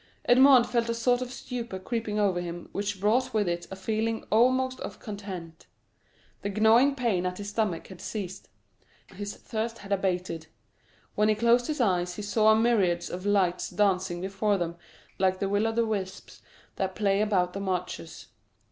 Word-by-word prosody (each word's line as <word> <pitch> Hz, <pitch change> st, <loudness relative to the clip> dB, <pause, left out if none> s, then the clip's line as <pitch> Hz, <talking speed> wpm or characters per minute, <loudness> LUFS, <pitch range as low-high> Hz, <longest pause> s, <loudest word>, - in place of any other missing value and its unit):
Edmond 255 Hz, 0 st, +7 dB
felt 235 Hz, -1 st, 0 dB
a 230 Hz, -, 0 dB
sort 245 Hz, +2 st, +2 dB
of 250 Hz, -1 st, -4 dB
stupor 235 Hz, -6 st, -5 dB
creeping 215 Hz, +1 st, -3 dB
over 195 Hz, -4 st, +2 dB
him 175 Hz, 0 st, -7 dB
which 200 Hz, -1 st, -3 dB
brought 230 Hz, +5 st, +1 dB
with 210 Hz, -3 st, +2 dB
it 175 Hz, 0 st, -2 dB
a 190 Hz, -, -6 dB
feeling 220 Hz, +3 st, -2 dB
almost 255 Hz, +3 st, +3 dB
of -, -, -6 dB
content; 190 Hz, -6 st, -8 dB, 0.7 s
the 200 Hz, -, -2 dB
gnawing 225 Hz, +7 st, +4 dB
pain 230 Hz, -9 st, 0 dB
at 180 Hz, 0 st, -4 dB
his 205 Hz, 0 st, -5 dB
stomach 205 Hz, -6 st, -1 dB
had 185 Hz, -2 st, -12 dB
ceased; 195 Hz, -4 st, -6 dB, 0.6 s
his 205 Hz, +2 st, -6 dB
thirst 225 Hz, +1 st, -4 dB
had 200 Hz, -2 st, -11 dB
abated; 180 Hz, -4 st, -1 dB, 0.7 s
when 210 Hz, +1 st, +2 dB
he 215 Hz, -, +3 dB
closed 235 Hz, +2 st, +3 dB
his 305 Hz, -2 st, -3 dB
eyes 180 Hz, -6 st, +1 dB
he 210 Hz, -, -6 dB
saw 215 Hz, +1 st, +4 dB
myriads 205 Hz, -7 st, +2 dB
of 185 Hz, +3 st, -5 dB
lights 190 Hz, -3 st, +1 dB
dancing 185 Hz, -2 st, +1 dB
before 195 Hz, +2 st, 0 dB
them 170 Hz, -2 st, -3 dB, 0.4 s
like 185 Hz, 0 st, +2 dB
the 195 Hz, -, -1 dB
will 205 Hz, +3 st, +1 dB
o' -, -, 0 dB
the 230 Hz, +1 st, +1 dB
wisps 195 Hz, -4 st, -5 dB, 0.4 s
that 190 Hz, -1 st, -2 dB
play 200 Hz, -1 st, +2 dB
about 185 Hz, -4 st, +1 dB
the 195 Hz, -, -4 dB
marshes. 180 Hz, -, -4 dB
205 Hz, 175 wpm, -28 LUFS, 185-230 Hz, 0.7 s, Edmond